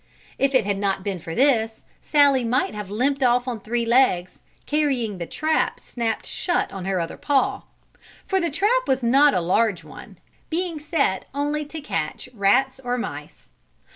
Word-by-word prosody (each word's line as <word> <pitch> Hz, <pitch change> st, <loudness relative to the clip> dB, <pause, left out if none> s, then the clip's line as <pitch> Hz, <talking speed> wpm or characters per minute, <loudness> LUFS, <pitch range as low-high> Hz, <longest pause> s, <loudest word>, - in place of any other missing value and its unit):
If 275 Hz, 0 st, +2 dB
it 245 Hz, -6 st, +4 dB
had 200 Hz, -1 st, -1 dB
not 195 Hz, -1 st, -1 dB
been 195 Hz, -2 st, -3 dB
for 165 Hz, 0 st, -7 dB
this 230 Hz, -5 st, +2 dB, 0.2 s
Sallie 285 Hz, -4 st, +4 dB
might 235 Hz, +1 st, 0 dB
have 210 Hz, -2 st, -6 dB
limped 270 Hz, +7 st, 0 dB
off 245 Hz, 0 st, +3 dB
on 240 Hz, -3 st, -3 dB
three 235 Hz, +3 st, -2 dB
legs, 230 Hz, -7 st, +2 dB, 0.3 s
carrying 265 Hz, -10 st, 0 dB
the 170 Hz, -, -4 dB
trap 315 Hz, 0 st, 0 dB
snapped 230 Hz, -2 st, -3 dB
shut 350 Hz, -, -1 dB
on 190 Hz, -2 st, -6 dB
her 190 Hz, -1 st, 0 dB
other 165 Hz, -1 st, -4 dB
paw; 280 Hz, -2 st, 0 dB, 0.6 s
for 385 Hz, -1 st, 0 dB
the 340 Hz, -, 0 dB
trap 420 Hz, -, +1 dB
was 265 Hz, -1 st, +1 dB
not 275 Hz, +5 st, +5 dB
a 180 Hz, -, +2 dB
large 190 Hz, +2 st, +1 dB
one, -, -, -12 dB, 0.3 s
being 335 Hz, -1 st, -2 dB
set 295 Hz, -, 0 dB
only 295 Hz, +1 st, -1 dB
to 310 Hz, +2 st, -8 dB
catch 165 Hz, -, -4 dB
rats 255 Hz, +6 st, +2 dB
or 245 Hz, 0 st, -1 dB
mice. 245 Hz, -, -7 dB
250 Hz, 170 wpm, -23 LUFS, 205-290 Hz, 0.6 s, not